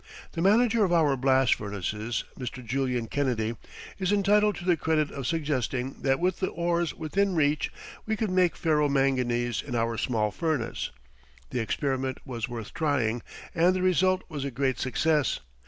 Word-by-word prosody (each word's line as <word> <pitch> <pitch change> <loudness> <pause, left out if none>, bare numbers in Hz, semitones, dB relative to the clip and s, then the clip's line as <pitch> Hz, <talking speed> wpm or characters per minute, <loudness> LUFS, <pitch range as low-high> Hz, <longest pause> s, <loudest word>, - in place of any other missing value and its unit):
The 165 - -4
manager 220 +4 +4
of 185 - +1
our 155 -5 +4
blast 130 -1 +3
furnaces, 105 +3 -3
Mr. 125 -1 -6
Julian 125 -1 -1
Kennedy, 120 -3 -1 0.4
is 190 0 0
entitled 205 +1 +3
to 175 - -8
the 180 -2 +4
credit 155 -2 0
of 135 -4 -4
suggesting 135 -4 -2
that 135 -1 +2
with 180 +1 0
the 185 - 0
ores 170 0 -1
within 190 +4 0
reach 150 -1 +1 0.4
we 220 - +1
could 215 -3 -1
make 185 -2 +3
ferro 150 -3 +2
manganese 125 -4 +1
in 125 -4 -5
our 115 -1 0
small 110 -4 0
furnace. 150 - -2 0.6
The 125 - -1
experiment 130 +2 -1
was 120 -3 -4
worth 115 -3 -6
trying 125 -7 0 0.3
and 175 +3 +3
the 185 - -1
result 185 +1 +3
was 150 -5 -5
a 140 - -2
great 130 0 -1
success. 140 +5 +1
140 Hz, 165 wpm, -27 LUFS, 120-175 Hz, 0.6 s, manager